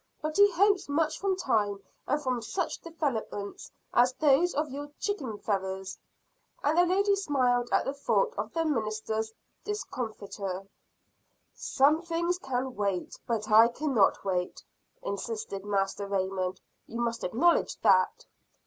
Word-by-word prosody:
But 310 0 -3
he 405 +2 +6
hopes 395 -1 +3
much 310 +2 +1
from 390 -1 +1
time, 210 - 0 0.3
and 290 - +1
from 255 -4 -1
such 340 - -3
developments 260 -11 -4 0.2
as 245 +1 +4
those 300 +5 +3
of 300 -1 -1
your 290 +2 -6
chicken 275 - -2
feathers" 190 -2 -3 0.7
and 295 +2 +2
the 350 +1 +5
lady 400 +2 +3
smiled 250 -9 +1
at - - +2
the 270 - -1
thought 445 - +1
of - - -3
the 330 -1 0
minister's 220 -4 -1 0.3
discomfiture. 205 - -4 0.9
"Some 295 +4 +2
things 340 +1 -1
can 260 -3 -3
wait, 200 -3 -2
but 220 -2 -2
I 220 +2 +8
cannot 240 -6 +1
wait," 180 -2 -2 0.4
insisted 200 -1 -4
Master 200 0 -1
Raymond. 190 -1 -1 0.3
"You 235 - -6
must 235 -1 -1
acknowledge 310 - +2
that." - - +3
250 Hz, 135 wpm, -29 LUFS, 205-320 Hz, 0.9 s, I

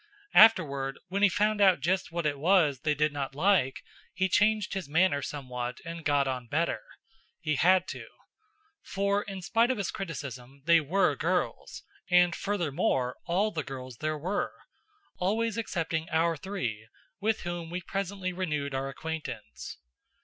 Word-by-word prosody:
Afterward, 140 -11 +5
when 195 +2 -1
he 205 - +6
found 210 +3 +1
out 190 -3 +6
just 185 0 0
what 170 -1 -2
it 145 -2 0
was 160 -5 +3
they 150 +1 0
did 150 +1 +1
not 135 -2 -4
like, 160 -5 +2 0.3
he 190 - +2
changed 210 +2 +2
his 190 -7 -4
manner 160 -2 +3
somewhat 125 -3 -5
and 165 0 -6
got 145 -2 +2
on 125 -2 -3
better. 165 +7 0 0.6
He 155 -2 -1
had 180 +5 +4
to. - - -7 0.7
For, 200 +1 0
in 195 -3 -7
spite 230 +5 +2
of 260 - 0
his 200 -3 -2
criticism, 140 - -7
they 170 0 +6
were 175 +6 +2
girls, - - -2 0.3
and, 180 -1 +5
furthermore, 150 -9 0
all 195 +5 +1
the 160 - -2
girls 130 -2 -8
there 155 +2 -2
were! 180 +7 -2 0.6
Always 220 +4 0
excepting 165 -7 -2
our 165 +1 +2
three! 135 - -4 0.3
with 215 +2 0
whom 175 -1 -4
we 175 +2 -3
presently 195 0 -3
renewed 150 -6 -2
our 135 +1 -2
acquaintance. 135 - -6
170 Hz, 155 wpm, -29 LUFS, 140-195 Hz, 0.7 s, he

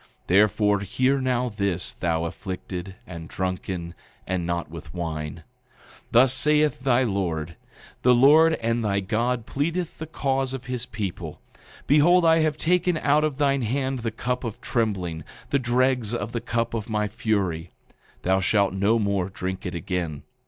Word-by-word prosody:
8:21 - - -38
Therefore 105 +1 +3
hear 130 +7 +1
now 125 -1 +1
this, 100 -5 -1
thou 80 -1 -1
afflicted, 95 +1 -6
and 85 -5 -9
drunken, 90 -2 -3 0.3
and 90 -2 -2
not 85 -1 -2
with 80 +3 -10
wine: 80 -3 -4 0.5
8:22 - - -23
Thus 125 +2 +5
saith 150 +3 +2
thy 130 -1 +3
Lord, 85 -7 -2 0.5
the 125 0 +5
Lord 155 +6 +6
and 115 -1 -1
thy 100 -2 +1
God 115 +4 -1
pleadeth 165 +6 -2
the 160 - -5
cause 135 -3 -1
of 125 - -8
his 125 -2 -3
people; 105 -5 -5 0.5
behold, 170 +5 +5
I 165 0 +5
have 155 -1 +1
taken 180 +1 +2
out 150 0 +3
of 150 -3 -1
thine 140 -2 +2
hand 130 +3 -1
the 115 -1 -2
cup 125 +3 -3
of 115 -4 -5
trembling, 95 -9 -2 0.3
the 140 - +3
dregs 125 -2 +1
of 105 -1 -4
the 115 - -3
cup 115 -1 -1
of 115 -1 -4
my 105 -1 0
fury; 100 -6 -1 0.5
thou 95 +1 +3
shalt 100 0 +2
no 100 +4 +2
more 100 -3 0
drink 95 0 -4
it 90 - -5
again. 85 -3 -3
110 Hz, 165 wpm, -25 LUFS, 95-130 Hz, 0.5 s, Lord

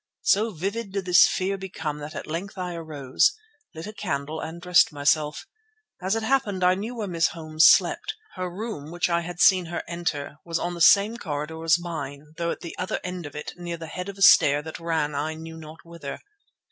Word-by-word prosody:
So 215 +3 +3
vivid 200 +3 -4
did 195 -2 -2
this 180 -1 +7
fear 195 +1 -1
become 160 -6 -5
that 150 +1 -8
at - - -5
length 175 +6 -5
I 180 -1 -3
arose, 155 - +1 0.4
lit 160 - -6
a 210 - -7
candle 155 -6 -3
and 160 +2 -6
dressed 180 0 +4
myself. 150 +1 +1 0.6
As 190 +4 0
it 225 - -2
happened 220 -7 +1
I 180 0 +5
knew 215 +6 -4
where 215 -3 -3
Miss 170 -3 +2
Holmes 155 -1 +3
slept. 430 - +3 0.2
Her 185 -1 -4
room, 185 -5 -6
which 175 +1 -1
I 170 0 +2
had 175 +1 -7
seen 185 -2 +5
her 170 - -4
enter, 170 -5 -3
was 165 -1 -2
on 175 0 -2
the 170 - -6
same 205 +6 +6
corridor 155 -3 -5
as 165 0 +5
mine 150 -4 -7
though 170 0 -1
at - - -4
the 170 - -7
other 185 - -2
end 180 -3 -5
of 145 - -13
it 150 - -6
near 175 -1 -5
the 165 - -7
head 180 +4 -6
of 200 - -8
a 195 - +1
stair 145 -7 +7
that 160 0 -7
ran 160 -3 -1
I 150 +3 -2
knew 160 0 -9
not 160 +1 -12
whither. 165 -4 -7
170 Hz, 215 wpm, -25 LUFS, 155-185 Hz, 0.6 s, this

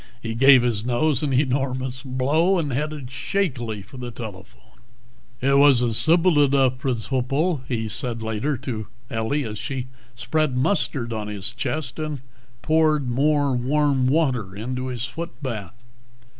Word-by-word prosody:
He 115 -2 -4
gave 130 +1 +6
his 115 -4 0
nose 125 +3 +1
an 150 -3 -1
enormous 130 -1 0
blow, 145 +8 +1
and 150 -6 -1
headed 150 -1 -3
shakily 125 - -2
for 115 +7 -13
the 125 -1 -5
telephone. 95 - -11 0.6
"It 140 +2 +4
was 140 -4 +6
a 120 -2 0
sipple 165 +6 +4
edough 135 -3 +3
pridciple," 135 - -1
he 115 -3 -2
said 115 +2 -1
later 110 +6 -1
to 110 -4 -5 0.2
Ellie 115 +6 -1
as 105 -1 -5
she 130 -3 -4 0.3
spread 125 +3 0
mustard 130 -6 0
on 110 -1 -4
his 105 +1 -3
chest 140 +2 -3
and 155 -4 -4 0.4
poured 155 -4 +2
more 145 +2 +2
warm 135 +1 +1
water 130 -10 +1
into 125 +5 -4
his 125 -2 -3
foot 165 +9 -6
bath. 115 -4 -5
130 Hz, 145 wpm, -23 LUFS, 120-145 Hz, 0.6 s, gave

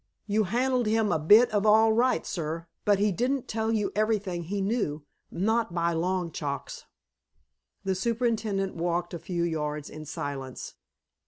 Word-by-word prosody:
"You 215 0 +1
handled 245 +4 +1
him 220 -1 +2
a 160 - +1
bit 210 +11 +6
of 205 -1 +1
all 220 +1 +5
right, 245 +3 +2
sir, 165 -1 -4 0.2
but 205 -1 +4
he 205 +1 +2
didn't 250 +7 -1
tell 220 0 -1
you 215 -2 0
everything 205 -5 0
he 200 +4 -3
knew, 195 -8 -1 0.2
not 220 0 0
by 170 0 +1
long 175 +1 -1
chalks." 140 -3 -5 1.0
The 190 -1 0
superintendent 215 -2 -1
walked 175 +1 -1
a 170 - -4
few 175 0 -2
yards 150 -3 -3
in 155 0 -8
silence. 135 -3 -6
195 Hz, 155 wpm, -27 LUFS, 170-220 Hz, 1.0 s, bit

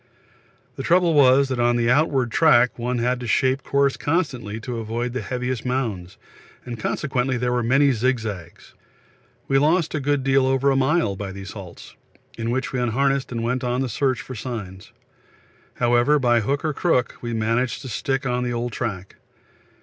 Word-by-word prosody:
The - - -4
trouble 175 -1 +3
was 140 -1 +5
that 130 -2 -2
on 120 0 +3
the 120 -1 +1
outward 135 -3 +2
track 125 -6 +4
one 125 +1 -1
had 125 +1 0
to 120 - -6
shape 130 +3 +2
course 140 0 +1
constantly 130 - -2
to 120 +1 -5
avoid 115 +2 -3
the 130 - -3
heaviest 125 +2 -3
mounds, 110 -8 -3 0.5
and 120 -2 -6
consequently 130 +1 -1
there 125 0 -1
were 125 0 +1
many 135 +4 +3
zig 125 +2 +1
zags. 100 -7 -8 0.7
We 135 - +3
lost 160 +3 +2
a 155 - -1
good 140 0 0
deal 135 0 +3
over 135 +1 +2
a - - +1
mile 135 - +1
by 95 0 -6
these 100 +1 -8
halts, 95 -5 -11 0.4
in 115 0 -3
which 130 +3 -2
we 130 - -1
unharnessed 135 +3 0
and 115 -1 -3
went 125 +2 -1
on 125 +1 -1
the 135 - -1
search 130 -1 0
for 130 - -9
signs. 105 -6 -7 0.8
However, 120 +4 +3
by 120 -4 +3
hook 140 +8 -1
or 155 - 0
crook, 140 -6 0
we 120 -1 -4
managed 115 +3 -1
to - - -7
stick 135 +3 -2
on 125 -1 -1
the 120 -1 -2
old 120 +1 -3
track. 100 -5 -5
125 Hz, 185 wpm, -22 LUFS, 115-135 Hz, 0.8 s, was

